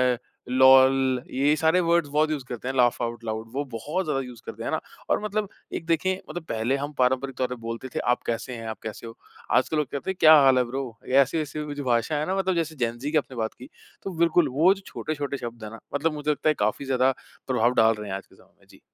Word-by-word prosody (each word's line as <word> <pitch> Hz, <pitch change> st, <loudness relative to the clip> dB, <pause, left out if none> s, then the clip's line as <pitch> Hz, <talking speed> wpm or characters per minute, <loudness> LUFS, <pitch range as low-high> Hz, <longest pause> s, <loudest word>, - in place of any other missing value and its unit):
अ, -, -, -13 dB, 0.3 s
लोल 130 Hz, 0 st, +5 dB
ये 145 Hz, +3 st, +3 dB
सारे 160 Hz, +3 st, +3 dB
वर्ड्स 170 Hz, -3 st, +2 dB
बहुत 155 Hz, +1 st, +2 dB
यूज़ 145 Hz, -4 st, -2 dB
करते 125 Hz, 0 st, -6 dB
हैं 130 Hz, -, -2 dB
लाफ़ 125 Hz, -2 st, +3 dB
आउट 115 Hz, 0 st, -4 dB
लाउड। 110 Hz, 0 st, -4 dB
वो 140 Hz, -, -1 dB
बहुत 155 Hz, +12 st, -2 dB
ज़्यादा 150 Hz, -3 st, 0 dB
यूज़ 125 Hz, -3 st, -10 dB
करते -, -, -7 dB
हैं, -, -, -2 dB
है -, -, +1 dB
ना? -, -, -1 dB, 0.3 s
और -, -, +2 dB
मतलब 210 Hz, 0 st, -1 dB, 0.3 s
एक 165 Hz, -, -4 dB
देखिए 185 Hz, +3 st, 0 dB
मतलब 160 Hz, +1 st, -5 dB
पहले 115 Hz, +4 st, 0 dB
हम 145 Hz, +2 st, -5 dB
पारंपरिक 130 Hz, +1 st, +1 dB
तौर 130 Hz, -, +1 dB
पर 125 Hz, -, -5 dB
बोलते 115 Hz, +3 st, -5 dB
थे। -, -, 0 dB
आप -, -, -5 dB
कैसे 120 Hz, +2 st, -3 dB
हैं? 115 Hz, -1 st, -7 dB
आप 110 Hz, -2 st, -5 dB
कैसे 110 Hz, +1 st, -7 dB
हो? 115 Hz, +1 st, -11 dB, 0.3 s
आज 130 Hz, -, +3 dB
के -, -, -1 dB
लोग 150 Hz, -3 st, +1 dB
कहते 145 Hz, +7 st, -3 dB
हैं -, -, -6 dB
क्या 155 Hz, 0 st, +8 dB
हाल 135 Hz, -1 st, +5 dB
है 125 Hz, -, +4 dB
ब्रो? 135 Hz, +3 st, -4 dB, 0.2 s
ऐसी-ऐसी 150 Hz, +3 st, +1 dB
जो 145 Hz, -, -4 dB
भाषा 120 Hz, +4 st, +1 dB
है 150 Hz, -, -1 dB
ना 190 Hz, -, 0 dB
मतलब 190 Hz, -1 st, +1 dB
जैसे 160 Hz, -2 st, -1 dB
जैन 115 Hz, 0 st, -1 dB
ज़ी 145 Hz, +3 st, -3 dB
की 160 Hz, -, +3 dB
आपने 130 Hz, -4 st, -3 dB
बात 110 Hz, -1 st, -2 dB
कि, 125 Hz, -, -13 dB, 0.3 s
तो 195 Hz, -, -4 dB
बिल्कुल 170 Hz, -1 st, +3 dB
वो 185 Hz, +4 st, +6 dB
जो 195 Hz, -, -12 dB
छोटे-छोटे 145 Hz, -5 st, -4 dB
शब्द 120 Hz, -2 st, -7 dB
है 105 Hz, -, -6 dB
ना? 115 Hz, -, -10 dB, 0.2 s
मतलब 160 Hz, +2 st, +1 dB
मुझे 150 Hz, 0 st, -1 dB
लगता 150 Hz, +2 st, 0 dB
है -, -, +4 dB
काफ़ी 110 Hz, +6 st, -2 dB
ज़्यादा 130 Hz, 0 st, +2 dB, 0.4 s
प्रभाव 125 Hz, -1 st, +2 dB
डाल 110 Hz, 0 st, +5 dB
रहे 105 Hz, -1 st, -7 dB
हैं 95 Hz, -, -2 dB
आज 100 Hz, -, -12 dB
के -, -, -22 dB
समय -, -, -23 dB
में। -, -, -26 dB
जी। -, -, -18 dB
135 Hz, 265 wpm, -25 LUFS, 120-155 Hz, 0.4 s, क्या